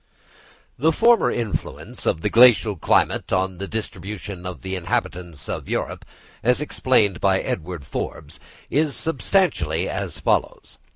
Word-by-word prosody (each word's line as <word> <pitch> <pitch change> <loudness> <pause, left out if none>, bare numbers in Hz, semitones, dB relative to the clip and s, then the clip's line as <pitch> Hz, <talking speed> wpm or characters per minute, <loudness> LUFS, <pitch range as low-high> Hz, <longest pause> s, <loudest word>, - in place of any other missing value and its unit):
The 160 +5 +4
former 230 +7 +4
influence 115 -4 -4
of 80 - +1
the 105 - 0
glacial 115 -3 +6
climate 80 - +1
on 95 -1 0
the 100 - -4
distribution 100 -3 -6
of 90 - -8
the 95 0 -4
inhabitants 85 -2 -3
of - - -5
Europe, - - -3 0.4
as 125 +2 +3
explained 130 -9 +1
by 95 -1 +3
Edward 85 -3 -4
Forbes, - - -6 0.3
is 150 0 +1
substantially 130 - 0
as 95 -6 -4
follows. 75 - -1
100 Hz, 130 wpm, -22 LUFS, 90-125 Hz, 0.4 s, glacial